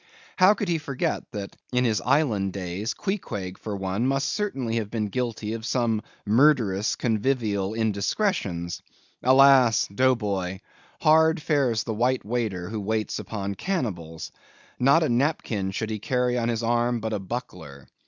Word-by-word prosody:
How 190 +3 +6
could 205 - -3
he 170 -2 +1
forget 140 -3 -3
that 100 -3 -6 0.2
in 125 0 +2
his 110 -3 +1
Island 105 -11 +1
days, 95 +3 -4
Queequeg, 105 - -4
for 105 -2 -5
one, 95 +5 -1
must 135 +1 0
certainly 135 - -2
have 110 -3 -2
been 105 -2 -2
guilty 115 -2 -3
of 115 -1 -5
some 115 -2 0 0.2
murderous, 110 -4 +3
convivial 110 -4 0
indiscretions. 100 - -1 0.4
Alas! 130 -3 +6
Dough 130 +4 +4
Boy! 95 -4 -3 0.4
hard 160 +1 +5
fares 140 -8 +1
the 110 - -3
white 125 +1 0
waiter 105 -6 -2
who 110 0 -4
waits 110 +1 -2
upon 100 -2 -4
cannibals. 95 - -4 0.5
Not 140 +6 +5
a - - +1
napkin 120 -6 0
should 110 +3 -3
he 110 - -3
carry 125 +2 0
on 120 -1 0
his 115 -1 -1
arm, 120 +1 +1
but 110 0 -3
a 105 - -1
buckler. 90 - -7
115 Hz, 155 wpm, -25 LUFS, 100-130 Hz, 0.5 s, How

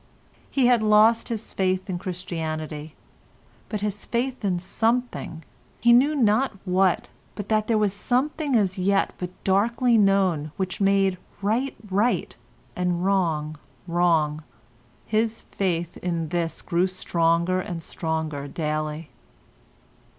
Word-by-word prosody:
He 270 -3 +2
had 245 -2 +5
lost 215 +2 +4
his 225 -2 -5
faith 185 0 0
in 180 -3 -3
Christianity, 160 -4 -5 0.7
but 210 -2 -3
his 205 -1 -2
faith 250 +1 -2
in 190 -3 +1
something—he 225 0 -1
knew 280 +5 +5
not 245 0 +2
what, 185 -1 +2 0.3
but 205 -2 -6
that 215 -1 +2
there 225 - +2
was 210 -2 +1
a - - -9
something 280 +2 0
as 195 -4 +1
yet 195 +2 +2
but 180 - -3
darkly 230 +4 +3
known 190 -7 +2
which 190 0 -3
made 195 -1 +3 0.2
right 235 +7 0
right 205 +5 0 0.4
and 180 0 -1
wrong 160 -6 0 0.3
wrong—his 155 - -1
faith 175 -3 -1
in 170 -3 -2
this 170 -1 -2
grew 175 +2 +1
stronger 170 0 +1
and 175 -4 -6
stronger 160 -4 -3
daily. 155 0 -3
185 Hz, 120 wpm, -24 LUFS, 165-215 Hz, 0.7 s, had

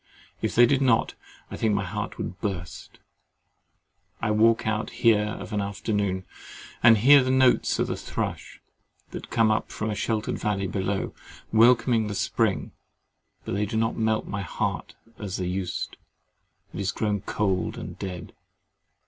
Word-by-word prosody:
If - - -2
they 120 - +8
did 140 +2 +2
not, 125 -4 +2 0.4
I - - -5
think 110 -2 +1
my 100 - 0
heart 90 - -5
would 90 - -6
burst. 95 -5 -5 1.2
I 105 - 0
walk 115 +2 +3
out 110 0 -1
here 105 -2 +2
of - - -8
an 105 - 0
afternoon, 100 -1 -2 0.6
and 115 -2 +7
hear 135 +5 +7
the 130 - -1
notes 130 -1 +3
of - - +1
the - - -3
thrush, - - -5 0.5
that - - -8
come 115 -2 +3
up 105 - 0
from 110 0 -3
a - - -1
sheltered 110 +1 -2
valley 105 -3 -1
below, 95 +1 -2 0.4
welcome 120 +2 +5
in 110 -2 +2
the 105 - -4
spring; - - 0 0.7
but - - -5
they 105 +2 0
do 110 +2 -3
not 115 +1 +1
melt 110 -1 0
my 100 0 -4
heart 90 - -3 0.2
as 100 -3 -4
they 90 - -2
used: 90 0 -3 0.8
it - - -6
is 100 -1 0
grown 105 -3 -1
cold 95 -3 -1
and - - -8
dead. 90 -3 -6
105 Hz, 165 wpm, -26 LUFS, 100-115 Hz, 1.2 s, they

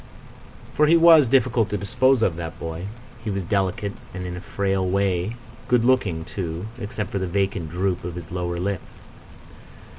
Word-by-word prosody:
For 150 - +4
he 165 +2 +6
was 165 -4 +7
difficult 125 -3 +3
to 105 - -1
dispose 130 +4 +2
of, 85 - +2
that 85 -1 -6
boy. 80 +3 -5 0.4
He 110 - -3
was 100 -2 -2
delicate 100 +2 -1 0.2
and, 90 0 -5
in 90 0 -5
a 90 - -7
frail 95 +2 -1
way, 95 +2 0 0.3
good 120 -2 +3
looking 100 -11 +2
too, 85 -1 -4
except 105 -1 -4
for 100 - -1
the 95 - -2
vacant 95 -2 -1
droop 90 +2 -1
of 85 -1 -5
his 85 -2 -8
lower 90 -1 -2
lip. 95 0 -2
95 Hz, 175 wpm, -23 LUFS, 90-110 Hz, 0.4 s, was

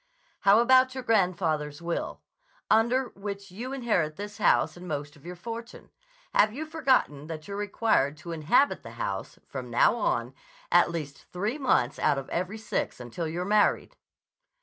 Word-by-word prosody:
"How 200 +1 +6
about 255 +1 +5
your 260 - -4
grandfather's 165 -9 +1
will, 170 0 -4 0.5
under 240 +3 +3
which 200 -1 -7
you 240 +8 -6
inherit 215 - 0
this 205 +3 -7
house - - +3
and 180 +1 -10
most 145 -2 -4
of 150 +3 -15
your 180 - -6
fortune? 230 +5 -8 0.4
Have 215 - +5
you 290 +8 -5
forgotten 260 - +1
that 155 -1 -7
you're 200 - -5
required 200 -8 +1
to 170 - -8
inhabit 165 - +2
the - - -10
house, - - -4
from - - -7
now - - +4
on, - - -1 0.4
at - - +5
least 150 -5 -6
three 210 +10 -2
months 150 - +1
out 145 -2 +2
of 135 - -5
every 185 +5 -2
six 220 - -3
until 125 +7 -5
you're 175 +3 -3
married?" 210 +1 +2
200 Hz, 165 wpm, -28 LUFS, 155-235 Hz, 0.5 s, How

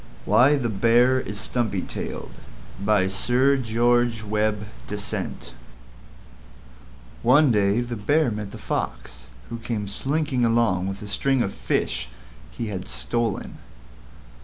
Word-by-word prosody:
WHY 135 +4 +5
THE 130 -4 -1
BEAR 120 +4 +3
IS 105 -4 -5
STUMPY 110 -7 -1
TAILED - - -6 0.5
By 105 -2 +3
Sir 125 +8 +2
George 120 -1 +1
Webbe 105 0 0 0.2
Dasent 100 -11 -5 1.7
One 135 +3 +5
day 105 +1 +2
the 120 0 -4
Bear 145 +6 +2
met 105 -1 -4
the - - -9
Fox, 60 0 -4 0.2
who 115 - -4
came 110 -3 -3
slinking 135 +5 0
along 115 -6 +2
with 95 +1 -5
a - - -7
string 130 +5 +1
of 100 - -3
fish - - -1 0.4
he 110 - -5
had 95 -2 -5
stolen. 115 -3 -2
110 Hz, 125 wpm, -24 LUFS, 100-120 Hz, 1.7 s, WHY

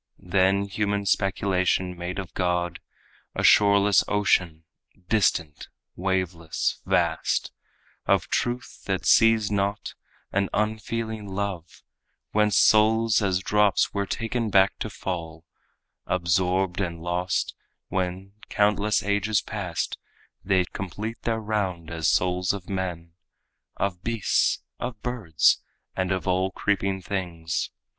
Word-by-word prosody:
Then 95 +2 +2
human 100 0 -1
speculation 95 -2 +1
made 90 +1 -5
of 95 -4 -6
God 90 -1 -1 0.6
A - - -2
shoreless 100 -2 +5
ocean, 90 -6 +1 0.5
distant, 85 -8 +1 0.3
waveless, 90 -3 -1
vast, 80 -1 +1 0.6
Of - - +2
truth 120 +1 -2
that 95 -2 -2
sees 115 -2 +5
not 100 0 -1 0.4
and 100 -1 0
unfeeling 110 0 -2
love, 95 -4 -5 0.5
Whence 105 -1 +3
souls 110 0 +4
as 95 -2 +1
drops 105 0 +2
were 100 -1 -1
taken 115 +1 -2
back 95 0 +3
to 110 - -3
fall, 85 -5 -5 0.6
Absorbed 90 +1 +1
and 85 -3 -3
lost, 90 +1 -1 0.4
when, 95 +1 -3 0.2
countless 105 0 +2
ages 105 +1 +1
passed, 90 -6 -4 0.4
They 95 -1 +3
should - - -14
complete 105 +5 -5
their 115 -1 -1
round 100 -7 -2
as 80 -1 -1
souls 90 0 +2
of 100 -3 -7
men, 90 -3 -4 0.7
Of 95 -3 -2
beasts, 115 -4 +1 0.2
of 120 -3 -5
birds 110 -11 +2 0.3
and 95 0 -1
of 95 0 -2
all 95 +1 +2
creeping 95 0 -1
things. 85 -4 -3
95 Hz, 115 wpm, -25 LUFS, 90-105 Hz, 0.7 s, shoreless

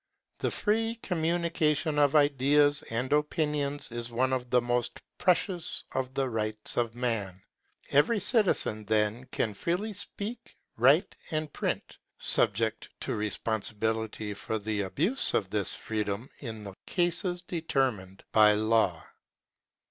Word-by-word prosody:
The - - 0
free 225 +2 0
communication 165 -5 0
of 145 0 +3
ideas 145 0 +4
and 125 +5 -1
opinions 150 -2 0
is 120 0 -3
one 130 +3 +1
of 125 -1 -2
the 125 - +4
most 120 0 -1 0.2
precious 180 -1 +1
of 130 0 -3
the 135 -1 +1
rights 110 -2 -1
of 120 -1 -1
man; 105 -7 -3 0.5
every 150 +11 +3
citizen 195 - +3
then 110 +3 0
can 110 -4 -2
freely 180 - -2
speak, 205 +3 -6 0.2
write, - - +4
and 155 -2 -3
print, - - -3 0.2
subject 110 +2 +2
to - - -2
responsibility 110 0 -2
for 110 +2 -3
the 105 0 -2
abuse 165 - +2
of 95 -2 0
this 105 -2 +1
freedom 105 +2 -3
in 110 -5 -7
the 100 -1 -8
cases 175 0 0
determined 130 - -2
by 105 -1 +6
law. 110 -5 +1
125 Hz, 125 wpm, -29 LUFS, 110-160 Hz, 0.5 s, by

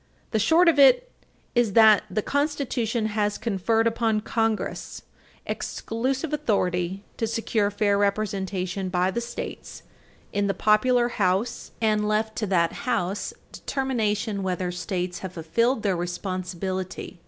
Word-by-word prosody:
." - - -36
The 220 - +1
short 325 - +4
of 315 -4 +4
it - - +6 0.4
is 240 -4 +2
that 220 -2 +6
the 215 - -1
Constitution 265 -6 -1
has 210 -1 0
conferred 225 +1 +1
upon 225 -2 +1
Congress 225 0 -2 0.4
exclusive 260 +7 -3
authority 185 -7 0
to 225 - -1
secure 220 -2 0
fair 205 0 +1
representation 195 -2 -1
by 180 +1 +1
the 235 - -2
States 235 0 -7 0.5
in 205 0 +1
the 195 - 0
popular 240 +5 +3
House, 200 +2 0
and 215 -1 +2
left 220 +1 0
to 215 - -1
that 170 -3 +2 0.2
House 205 -4 -1 0.2
determination 220 -6 -1
whether 185 -1 -2
States 180 0 -3
have 190 -2 -7
fulfilled 225 +9 0
their 195 -3 +1
responsibility. 185 +1 -4
210 Hz, 130 wpm, -25 LUFS, 190-230 Hz, 0.5 s, it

